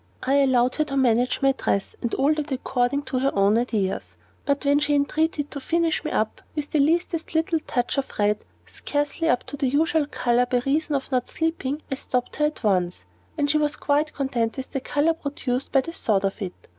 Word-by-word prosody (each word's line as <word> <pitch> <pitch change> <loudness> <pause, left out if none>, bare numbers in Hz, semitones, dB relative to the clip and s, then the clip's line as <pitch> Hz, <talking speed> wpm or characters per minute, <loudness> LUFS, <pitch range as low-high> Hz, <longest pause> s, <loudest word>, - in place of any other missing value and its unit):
I 270 +2 +3
allowed 255 -2 +3
her 310 - +3
to 275 -1 -3
manage 250 0 +2
my 270 - +6
dress 200 -6 -1
and 235 - -1
all 280 +3 +3
that 305 -1 -4
according 260 +1 0
to 260 -2 -2
her 270 +2 +2
own 200 +1 +4
ideas; 220 -5 -1 0.3
but 280 0 0
when 285 +1 +4
she 295 0 +1
entreated 295 +1 0
to 285 - -5
finish 330 +3 0
me 310 - -2
up 215 - -1
with 300 -1 -4
the 305 - +2
"leastest 330 +2 +1
little 325 0 +2
touch 245 +3 0
of 270 - -4
red, 210 0 +1 0.2
scarcely 290 +3 -2
up 245 - +2
to 285 - -7
the 275 -1 +1
usual 300 +2 +2
color, 245 -3 +1
by 245 0 +1
reason 295 +2 +1
of 275 0 -3
not 250 -1 0
sleeping," 315 -3 -2
I - - +2
stopped 250 -2 -2
her 300 - +3
at 300 -3 -3
once, 180 - 0 0.3
and 290 - +2
she 305 +1 +2
was 300 0 0
quite 295 +1 0
content 255 -4 -1
with 265 - -6
the 270 - -1
color 295 +5 +1
produced 275 -4 -3
by 270 - +4
the 330 +4 -7
thought 200 -10 +1
of 195 +3 -3
it. 185 -2 -4
275 Hz, 215 wpm, -24 LUFS, 245-300 Hz, 0.3 s, my